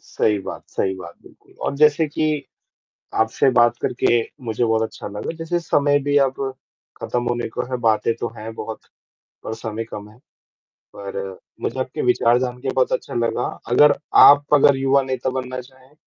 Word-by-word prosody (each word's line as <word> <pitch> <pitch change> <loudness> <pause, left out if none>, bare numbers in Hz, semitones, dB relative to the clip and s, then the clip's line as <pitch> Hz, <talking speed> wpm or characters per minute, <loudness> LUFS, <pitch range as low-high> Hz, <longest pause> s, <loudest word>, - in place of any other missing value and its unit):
सही 105 -2 0
बात, - - -7
सही 95 0 -1
बात 85 -2 -10
बिल्कुल, - - -20
और - - -2
जैसे 150 +1 +4
कि 150 -1 -1 0.8
आपसे 110 +4 +2
बात 120 0 +4
करके 120 -1 +2 0.2
मुझे 115 +1 -1
बहुत 110 0 +1
अच्छा 110 - -6
लगा 105 +10 -5
जैसे 170 +1 -2
समय 145 -3 +2
भी 145 0 0
अब 130 - -7 0.6
ख़त्म 120 0 -2
होने 120 0 -1
को - - -3
है 125 - -1
बातें 110 0 +2
तो 120 - -2
हैं 110 +1 -7
बहुत 110 - -6 0.6
पर 110 - -4
समय 115 0 -5
कम 105 0 -8
है, 110 - -19 0.8
पर 100 -1 -6 0.2
मुझे - - -3
आपके 130 0 -3
विचार 120 -1 +3
जानके 125 +1 -3
बहुत 130 -1 +1
अच्छा - - -3
लगा 120 +1 0 0.2
अगर 145 +5 +6 0.3
आप 145 0 +8
अगर 140 -1 +6
युवा 135 +1 +3
नेता 130 0 -2
बनना 130 0 -5
चाहें 130 +2 -20
125 Hz, 170 wpm, -21 LUFS, 110-140 Hz, 0.8 s, आप